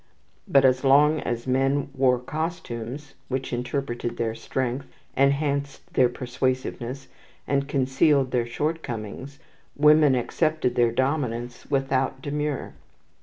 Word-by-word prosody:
But 135 -1 +5
as 130 0 +3
long 145 +3 +5
as 120 -3 -3
men 135 +2 +1
wore 130 -2 +3
costumes 135 -2 -5
which 130 0 -3
interpreted 120 -1 -3
their 115 -1 -1
strength, 130 +3 -3 0.3
enhanced 140 0 0
their 125 -1 +4
persuasiveness, 130 +1 -3 0.4
and 140 0 0
concealed 135 0 +2
their 120 -2 0
shortcomings, 130 -2 -4 0.4
women 150 -1 +5
accepted 155 +1 0
their 120 -1 +3
dominance 125 -2 -2
without 135 -1 0
demur. 150 0 -3
135 Hz, 110 wpm, -25 LUFS, 125-145 Hz, 0.4 s, But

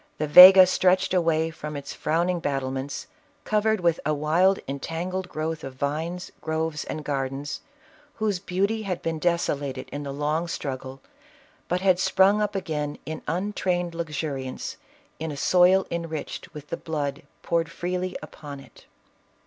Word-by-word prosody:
The 155 - -1
Vega 185 +5 +11
stretched 185 0 +2
away 165 -2 +2
from 150 -2 -7
its 140 0 -7
frown 165 +3 0
ing 180 -1 0
battlements, 135 -2 -3 0.4
covered 215 -1 +1
with 170 -2 +2
a 155 - 0
wild, 170 +6 +3
entangled 175 +6 -4
growth 160 0 -3
of 135 -1 -7
vines, 160 +6 -3
groves 160 -1 -2
and 155 - -5
gardens, 135 0 -3 0.5
whose 210 -4 -1
beauty 200 +4 -1
had 190 -4 -4
been 165 -1 -2
desolated 145 -6 -1
in 145 - -4
the 140 -1 -5
long 150 +4 -1
struggle, 135 -4 -5 0.7
but 180 +1 -1
had 185 -2 +3
sprung 195 +2 +4
up 205 -1 -1
again 150 -6 -3
in 155 0 -5
untrained 180 -1 -1
luxuriance, 150 -5 -4 0.4
in 160 0 -3
a 145 - -6
soil 185 +4 +4
enriched 165 0 -5
with 150 -2 -11
the - - -3
blood 145 -3 -3 0.2
poured 165 -2 0
freely 180 +2 -3
upon 145 -2 -9
it. 135 - -17
165 Hz, 150 wpm, -25 LUFS, 145-180 Hz, 0.7 s, Vega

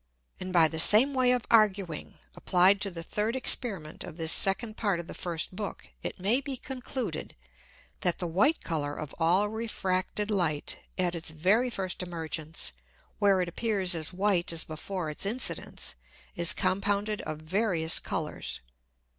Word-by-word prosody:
And 185 0 -5
by 170 -3 +6
the 160 0 -5
same 225 - +7
way 255 -1 +3
of 250 -2 +1
arguing, 195 -7 +2 0.2
applied 190 +2 +3
to 200 - -1
the 170 -3 -8
third 210 +6 -2
Experiment 200 -11 0
of 160 - -10
this 160 -1 +3
second 215 +3 +4
Part 200 -6 0
of 170 - -5
the - - -9
first 170 +1 -3
Book, 205 0 -6
it - - -5
may 215 +8 +2
be 275 -1 -5
concluded, 260 0 -5 0.6
that 175 -2 +1
the 180 - -4
white 200 - +2
Colour 145 -3 -2
of 150 -3 -7
all 180 +5 +3
refracted 210 -2 0
Light 165 -7 0 0.2
at 180 -2 +1
its 170 -1 -5
very 190 +11 +2
first 190 -6 -3
Emergence, 165 -2 -4 0.5
where 200 -3 +4
it 180 - -1
appears 195 -1 0
as 160 -1 -2
white 185 -2 +1
as 165 -1 -1
before 160 +1 -5
its 150 - -3
Incidence, 225 +6 -1 0.4
is 170 -2 +4
compounded 200 +4 0
of 155 -1 -5
various 165 0 0
Colours. - - -4
185 Hz, 160 wpm, -28 LUFS, 165-210 Hz, 0.6 s, same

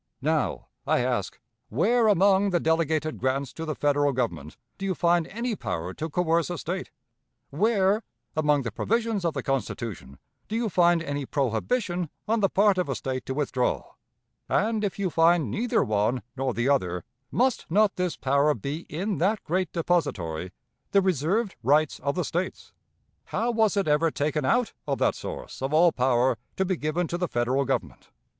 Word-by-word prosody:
Now, - - 0 0.2
I - - +3
ask, 120 -6 -1 0.3
where 220 - +3
among 200 0 +4
the 175 -2 +2
delegated 160 -1 0
grants 130 -1 -1
to 165 - -5
the 155 -2 -3
Federal 145 -1 +2
Government 85 - -3 0.2
do 195 - -3
you 185 - 0
find 170 -1 +2
any 235 +3 -3
power 90 - -4
to 160 +9 -4
coerce 165 +1 +1
a 175 - -3
State; 185 +4 -4 0.6
where 200 +4 +2 0.3
among 150 -2 +2
the 115 - -3
provisions 225 - 0
of 170 -2 0
the - - -3
Constitution 115 - -3 0.3
do 215 - -4
you 230 -1 0
find 175 -2 +3
any 145 -3 -3
prohibition 175 - -1 0.2
on 225 +2 +2
the 195 -2 +3
part 200 -1 +3
of 175 -5 -1
a 135 - -1
State 130 +1 -4
to 130 - -2
withdraw; 135 -3 -1 0.6
and, 215 +1 +1
if 200 - -2
you 195 -3 -1
find 165 -7 +3
neither 240 +1 +1
one 110 +4 0
nor 130 -2 -1
the 120 +2 0
other, 90 -11 +1 0.3
must 255 0 0
not 205 +3 +3
this 180 -3 -2
power 140 +2 +2
be 140 - -5
in 190 +6 -2
that 200 +5 +1
great 180 0 -1
depository, 95 - -1 0.4
the 200 - +6
reserved 190 - 0
rights 145 +5 +2
of 140 +2 -1
the 180 - -1
States? 175 +5 -4 0.5
How 235 +2 -1
was 220 -3 +2
it 195 - +1
ever 150 +2 +3
taken 150 -1 -1
out 240 - +2
of - - 0
that - - +2
source - - -7
of 135 +3 0
all 170 +2 +6
power 125 -3 +2 0.2
to 190 - +1
be 185 0 0
given 155 +3 -1
to 175 - -2
the 180 - 0
Federal 125 +2 0
Government? 85 - -3
160 Hz, 180 wpm, -26 LUFS, 135-190 Hz, 0.6 s, the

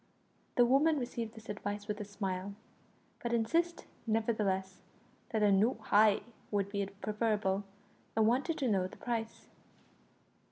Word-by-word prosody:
The 245 - +6
woman 290 +5 +4
received 235 -3 -4
this 220 0 -12
advice 205 0 -4
with 210 0 -3
a - - -2
smile, 195 -1 -4 0.7
but 235 0 -2
insisted 330 +10 +1 0.2
nevertheless 210 -4 0 0.5
that 220 -2 +1
a 205 - +5
"noo 215 +6 +4
heye" 210 0 +4 0.3
would 200 -1 0
be 200 -1 -1
preferable, 205 -1 -1 0.5
and 220 -1 +4
wanted 265 +8 +2
to 270 - 0
know 190 -4 +2
the - - -13
price. 230 -2 -3
215 Hz, 135 wpm, -33 LUFS, 200-235 Hz, 0.7 s, The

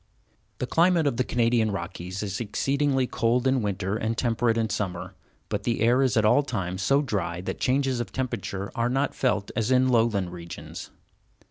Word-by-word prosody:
The - - -2
climate 170 +3 +3
of 140 -5 0
the 130 - +2
Canadian 115 -2 +2
Rockies 95 0 -5
is 100 +1 -3
exceedingly 135 +4 +1
cold 120 +1 0
in 130 -1 +2
winter 100 0 -1
and 110 0 -2
temperate 115 -1 +1
in 115 -1 +1
summer, 95 -5 -3 0.3
but - - -2
the 115 -3 -1
air 120 +4 +4
is 130 -5 +2
at 110 - +4
all 125 +7 +5
times 95 -9 -3
so 140 +9 +3
dry 100 -9 -2
that 95 - -5
changes 130 -1 +1
of 120 - -4
temperature 105 -6 -3
are 120 -1 0
not 135 +3 0
felt 105 -6 0
as 110 -1 0
in 130 0 +4
lowland 110 -7 +2
regions. 85 -1 -8
115 Hz, 180 wpm, -26 LUFS, 100-130 Hz, 0.3 s, all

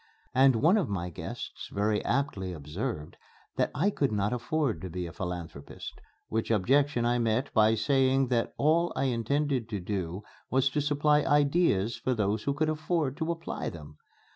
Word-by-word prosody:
And 130 0 +5
one 165 - +4
of 185 -9 0
my 90 -3 -3
guests - - -7
very 105 +1 0
aptly 115 -9 -1
observed 75 - -5 0.4
that - - +1
I 180 +10 +2
could 140 - 0
not 105 +1 0
afford 135 +1 -1
to 95 - -5
be 90 +1 -4
a 85 - -8
philanthropist, 85 -6 -7 0.3
which 110 0 -2
objection 125 +4 +2
I 120 +1 +2
met 115 +4 0
by 110 0 +5
saying 135 +2 +2
that 120 -2 0
all 165 +4 +3
I - - 0
intended 130 0 0
to 105 -3 -3
do 95 0 -4 0.3
was 135 +1 +2
to 150 - 0
supply 150 +1 +3
ideas 145 - +2
for 130 - -1
those 105 0 -1
who 140 0 0
could 155 +2 +1
afford 155 -2 -1
to 160 +1 -1
apply 165 0 -4
them. 75 -2 -11
125 Hz, 170 wpm, -29 LUFS, 100-145 Hz, 0.4 s, And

